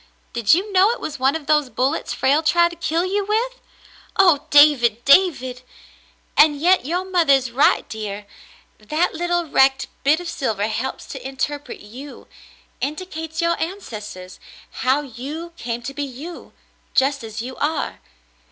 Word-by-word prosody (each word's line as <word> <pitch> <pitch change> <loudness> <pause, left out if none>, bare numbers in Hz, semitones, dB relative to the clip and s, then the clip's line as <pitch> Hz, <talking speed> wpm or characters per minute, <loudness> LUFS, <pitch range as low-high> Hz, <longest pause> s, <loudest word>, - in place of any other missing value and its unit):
Did 235 +2 +4
you 395 +3 -3
know 380 +2 +5
it 480 - -2
was 295 -3 -6
one 265 +3 +2
of 320 -3 -5
those 300 -3 +2
bullets 265 +5 -1
Frale 280 +4 +2
tried 340 +2 +3
to 345 - -10
kill 335 +1 -1
you 400 +2 0
with? 465 +5 -1 0.6
Oh, 350 -7 +4
David, 255 -6 +5
David!" 275 -6 +3 0.7
"And 295 -1 +5
yet 355 -3 +3
your 355 +4 -1
mother 350 -6 +3
is 260 -3 +1
right, 265 +5 +3
dear. 210 -2 -6 0.5
That 305 +11 -1
little 345 +1 -1
wrecked 270 -2 +2
bit 295 +4 +3
of 355 - -7
silver 220 -10 -2
helps 230 +5 -4
to 265 - -8
interpret 285 +2 -4
you 255 +8 -11 0.3
— - - -31
indicates 320 +2 -4
your 340 0 +2
ancestors 210 - -7 0.2
— - - -22
how 265 +3 +3
you 295 +6 -7
come 235 0 -3
to 275 +3 -5
be 290 - -5
you 285 +6 -9 0.2
— - - -39
just 275 0 +2
as 225 0 -6
you 255 +1 -7
are. 305 +1 -2
290 Hz, 165 wpm, -21 LUFS, 255-340 Hz, 0.7 s, know